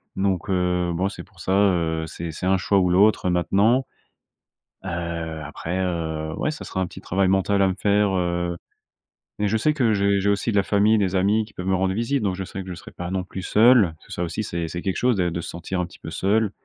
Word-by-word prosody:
donc, 95 -2 -1
heu, 90 -1 +1
bon, 95 +3 0
c'est - - -9
pour - - -22
ça, 95 - -1
heu, 85 -5 +2
c'est 85 +1 -6
c'est 90 - -6
un 95 0 +3
choix 100 +3 +1
ou 90 - +2
l'autre 100 0 +4
maintenant. 105 +9 +2 1.0
Heu, - - -3 0.6
après, 80 +4 -4
heu, 80 -3 -2
ouais, - - -1
ça 150 - -8
sera 95 - -3
un 90 - 0
petit - - -11
travail 95 +1 0
mental 95 +1 +2
à 95 - +4
me 95 - -2
faire, 105 0 +3
heu, 85 -1 -1 0.8
mais 105 0 +1
je 110 - +1
sais 150 +8 +2
que 120 -7 +2
j'ai 100 0 +2
j'ai 100 - 0
aussi 100 +3 +1
de 105 - -1
la 100 - +5
famille, 105 +2 +3
des 95 -2 0
amis, 105 +4 +2
qui 105 - -19
peuvent 90 - -6
me 95 - +2
rendre 95 0 +1
visite, 120 +3 0
donc 95 -3 0
je 95 - -4
sais 95 +1 -6
que 95 - -11
je 90 - -4
serai 85 - -11
pas 90 0 -6
non 95 -1 -2
plus 95 0 -7
seul. 110 -4 +5
Parce - - -22
que - - -11
ça, 90 - -3
aussi, 85 +5 -2
c'est 85 -3 -3
c'est 85 +1 -5
quelque 95 - -2
chose 125 -3 +2
dè 90 -2 +1
de 85 - -3
se - - -7
sentir 85 +2 -4
un 90 - -1
petit 85 - -16
peu - - -8
seul, 105 +2 +1
95 Hz, 255 wpm, -23 LUFS, 90-100 Hz, 1.0 s, la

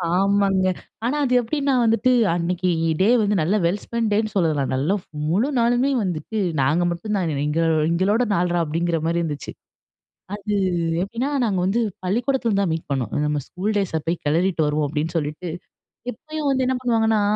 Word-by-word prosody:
ஆமாங்க. 195 -1 +2 0.4
ஆனா, 255 +5 0
அது 255 - 0
எப்படின்னா 275 +3 -1
வந்துட்டு 230 +2 +3 0.2
அன்னைக்கு 180 +1 -1 0.3
டே 200 - +4
வந்து 210 0 +1
நல்ல 175 +7 +1
வெல் 190 +4 0
ஸ்பென்ட் 230 -2 -1
டேன் 215 +2 +2
னு 210 - -12
சொல்லலாம். 155 -7 +1
நல்ல 150 +10 +1 0.3
முழு 215 - +2
நாளுமே 245 +4 +2
வந்துட்டு 180 +4 -3 0.2
நாங்க 150 +7 +2
மட்டும் 170 +5 -4
தான் 170 -4 -1
எங்க 150 +2 0 0.3
எங்களோட 195 +8 +2
நாள்றா 175 -1 +1
அப்படிங்கிற 165 +2 -1
மாரி 170 +1 +1
இருந்துச்சு. 150 -4 -4 0.8
அது 210 0 -4 0.5
எப்படின்னா, 235 +8 -2 0.2
நாங்க 195 -5 0
வந்து 220 +5 +1 0.2
பள்ளிக்கூடத்துல 235 +1 0
தான் 180 -5 0
மீட் 160 -2 -5
பண்ணோம். 130 -6 -1
நம்ம 150 -1 0
ஸ்கூல் 205 +4 -3
டேஸ 175 -5 0
போய் 170 +1 -1
கெளறிட்டு 165 +1 +1
வருவோம் 150 0 0
அப்படின்னு 155 +2 -2
சொல்லிட்டு 155 +3 -3 0.6
எப்பயும் 305 +4 -4
வந்து 265 -1 +1
என்ன 260 - +1
பண்ணுவாங்கன்னா, 225 -3 +2
190 Hz, 165 wpm, -22 LUFS, 165-225 Hz, 0.8 s, டே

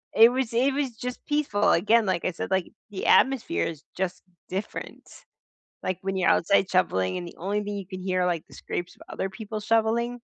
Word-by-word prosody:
it 230 +2 +8
was 255 -3 -1
it 265 +4 +3
was 275 -3 -1
just 250 +1 -6
peaceful 295 -9 +2
again, 215 +5 +4
like 185 -3 0
I 185 - +1
said, 175 - -5
like, 190 -2 0 0.2
the 195 - -5
atmosphere 250 - +3
is 160 -2 -6
just 185 -1 -2 0.3
different, 195 +3 -5 0.8
like, 185 - -2
when 195 0 -2
you're 185 - +3
outside 195 +2 +3
shoveling, 95 - +1
and 175 - -6
the - - -14
only 205 +4 -1
thing 205 0 -4
you 195 - -6
can 185 0 -7
hear 185 -1 0
are, 180 - +2
like, 170 -3 -1
the - - -16
scrapes 175 - -5
of - - -15
other 195 - -2
people 215 +2 -6
shoveling. 230 +2 +1
200 Hz, 210 wpm, -26 LUFS, 185-230 Hz, 0.8 s, it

